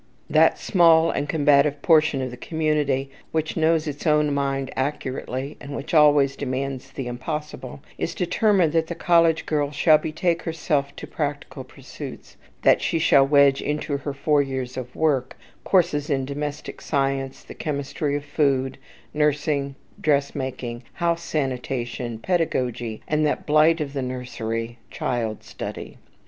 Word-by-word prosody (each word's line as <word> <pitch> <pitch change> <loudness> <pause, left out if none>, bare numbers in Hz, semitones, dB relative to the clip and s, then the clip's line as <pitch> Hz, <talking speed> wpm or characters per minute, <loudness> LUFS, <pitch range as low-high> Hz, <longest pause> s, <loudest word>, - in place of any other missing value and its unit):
That - - +5
small 165 -3 +4
and 145 - -3
combative 145 -2 +3
portion 155 -5 +4
of 130 - -4
the - - -7
community 145 -2 -1 0.2
which 160 0 -1
knows 160 -1 +2
its 145 +2 -4
own 150 -1 +3
mind 135 -1 -1
accurately, 135 0 -3
and 140 0 -7
which 145 +5 -6
always 145 -3 +5
demands 135 -1 -4
the 135 - -5
impossible, 130 +1 -5 0.2
is - - -2
determined 180 -2 +2
that 165 -1 +2
the 170 - -5
college 165 -1 +3
girl 145 -2 0
shall 150 +1 +4
betake 165 +2 -1
herself 150 -3 -1
to - - -7
practical - - -4
pursuits, - - -10 0.3
that - - +5
she - - 0
shall 140 -4 +5
wedge 140 -1 +5
into 150 -1 -2
her 140 +1 -4
four 145 +1 +2
years 130 -2 -4
of 125 -1 -7
work, 140 -5 0 0.3
courses 165 -6 +2
in 135 -2 0
domestic 145 +2 -5
science, 135 -2 -1
the - - -10
chemistry 145 -1 -3
of 145 0 -4
food, 135 -4 0 0.3
nursing, 150 -2 0 0.3
dressmaking, 130 -5 -1
house 170 0 0
sanitation, 125 -5 -3
pedagogy, 120 -7 -1
and 155 0 +1
that 150 - 0
blight 155 +2 +4
of 145 -2 -4
the 140 - -2
nursery, 120 -2 -4
child 115 -3 -3
study. - - -7
145 Hz, 145 wpm, -23 LUFS, 135-155 Hz, 0.3 s, That